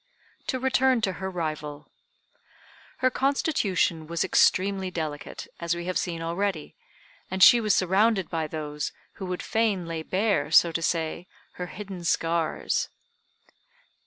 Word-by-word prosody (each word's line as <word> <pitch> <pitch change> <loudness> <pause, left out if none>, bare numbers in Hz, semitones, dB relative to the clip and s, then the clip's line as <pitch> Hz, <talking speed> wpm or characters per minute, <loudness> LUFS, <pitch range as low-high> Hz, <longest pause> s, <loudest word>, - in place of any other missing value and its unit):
To 260 - 0
return 260 -1 +3
to 195 -3 0
her 190 - -2
rival. 155 -4 -5 1.1
Her 255 - +5
constitution 205 - +1
was 170 +1 0
extremely 190 0 +2
delicate, 155 -4 -5
as 170 0 -1
we 175 0 -5
have 185 0 0
seen 165 -2 -3
already, 170 -1 -2 0.5
and 190 0 +2
she 240 - +9
was 215 -2 +3
surrounded 190 +1 +2
by 160 -2 -2
those 150 -2 -4 0.3
who 190 - -3
would 180 0 -4
fain 215 -5 0
lay 165 -1 -4
bare, 185 -4 0
so 165 +1 +6
to 165 - -2
say, 165 +1 -1 0.2
her 180 - -6
hidden 190 +1 -8
scars. 165 -1 0
180 Hz, 135 wpm, -26 LUFS, 165-200 Hz, 1.1 s, she